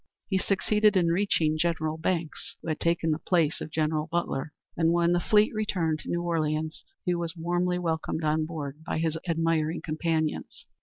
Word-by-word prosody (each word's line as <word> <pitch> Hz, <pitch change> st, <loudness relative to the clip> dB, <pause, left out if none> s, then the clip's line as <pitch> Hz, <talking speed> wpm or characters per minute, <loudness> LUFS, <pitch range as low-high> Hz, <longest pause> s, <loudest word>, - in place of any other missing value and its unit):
He 190 Hz, -2 st, +2 dB
succeeded 210 Hz, +1 st, +3 dB
in 170 Hz, -2 st, +3 dB
reaching 165 Hz, -4 st, +2 dB
General 160 Hz, -2 st, 0 dB
Banks, 165 Hz, -1 st, -2 dB
who -, -, -4 dB
had 155 Hz, -, -1 dB
taken 170 Hz, -1 st, +1 dB
the 155 Hz, -, 0 dB
place 165 Hz, -4 st, +1 dB
of -, -, -5 dB
General 155 Hz, 0 st, 0 dB
Butler, 160 Hz, -4 st, -1 dB, 0.2 s
and 165 Hz, -1 st, +3 dB
when 170 Hz, 0 st, +3 dB
the 175 Hz, -, +3 dB
fleet 210 Hz, +4 st, +3 dB
returned 180 Hz, -7 st, 0 dB
to -, -, -9 dB
New 175 Hz, 0 st, 0 dB
Orleans, 155 Hz, -2 st, -1 dB, 0.2 s
he 180 Hz, -, +2 dB
was 170 Hz, 0 st, -3 dB
warmly 175 Hz, +2 st, 0 dB
welcomed 160 Hz, -2 st, -2 dB
on 155 Hz, 0 st, +1 dB
board 150 Hz, -2 st, -6 dB
by 175 Hz, -, -2 dB
his 160 Hz, 0 st, 0 dB
admiring 165 Hz, -1 st, +1 dB
companions. 155 Hz, 0 st, -2 dB
165 Hz, 175 wpm, -28 LUFS, 155-175 Hz, 0.2 s, succeeded